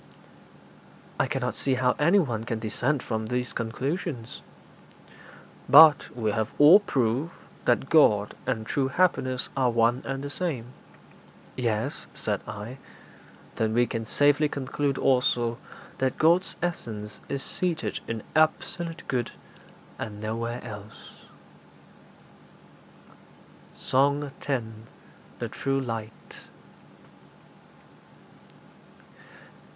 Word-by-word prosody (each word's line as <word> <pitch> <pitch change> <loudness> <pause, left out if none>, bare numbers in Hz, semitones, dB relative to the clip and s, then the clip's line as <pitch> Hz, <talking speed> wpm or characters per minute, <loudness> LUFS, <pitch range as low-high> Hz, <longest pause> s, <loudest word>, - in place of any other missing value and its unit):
'I - - +2
cannot - - -2
see 135 -2 0
how 125 0 +2
anyone 150 - +2
can 115 -1 -3
dissent 125 +6 0
from 110 -1 -3
these 125 +1 -2
conclusions.' 130 +2 -4 1.3
'But 150 +1 +8
we 110 -3 0
have 110 +2 -1
also 155 +7 +9
proved 130 +6 0 0.3
that 120 +2 +2
God 105 -11 +4
and 110 -4 -1
true 135 +3 0
happiness 130 -5 +1
are 130 -2 +2
one 120 +2 +2
and 135 0 -4
the 145 - -4
same.' 135 -9 -3 0.8
'Yes,' 115 -3 -2
said - - -2
I. 115 +6 -7 0.8
'Then 110 0 0
we 120 0 +4
can 115 -1 -4
safely 145 +5 +3
conclude, 140 0 -2
also, 120 -2 +1 0.4
that 130 -1 0
God's 170 +4 +3
essence 110 -12 -4
is 140 -1 -2
seated 170 -3 -2
in 115 -2 -4
absolute 165 +2 0
good, 125 -3 -1 0.7
and 105 -2 -6
nowhere 115 +3 -4
else.' 105 -2 -10 2.6
SONG 140 +2 +1
X. 135 -3 0 0.8
THE - - -4
TRUE 135 0 -1
LIGHT. 115 -4 -7
130 Hz, 100 wpm, -26 LUFS, 115-145 Hz, 2.6 s, also